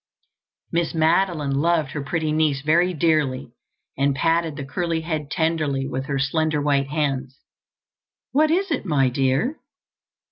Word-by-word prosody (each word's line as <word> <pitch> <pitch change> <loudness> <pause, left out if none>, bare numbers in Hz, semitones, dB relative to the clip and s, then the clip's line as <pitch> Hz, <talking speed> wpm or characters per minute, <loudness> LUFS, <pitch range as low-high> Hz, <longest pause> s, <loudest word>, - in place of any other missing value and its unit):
Miss 170 0 -1
Madeline 160 -2 +2
loved 155 0 +1
her 150 - -4
pretty 155 +2 -2
niece 155 -3 +1
very 170 +5 +3
dearly 150 -7 0 0.4
and 140 0 +1
patted 165 +1 +1
the 140 - -6
curly 165 +3 -2
head 155 -3 -3
tenderly 155 -5 0
with 130 -1 -4
her 140 - -1
slender 155 +3 0
white 140 -1 +1
hands. 135 -3 -2 0.9
"What 310 +2 +3
is 370 +3 +1
it, 290 - -1
my 145 -8 +2
dear?" 135 - 0
155 Hz, 140 wpm, -23 LUFS, 140-165 Hz, 0.9 s, very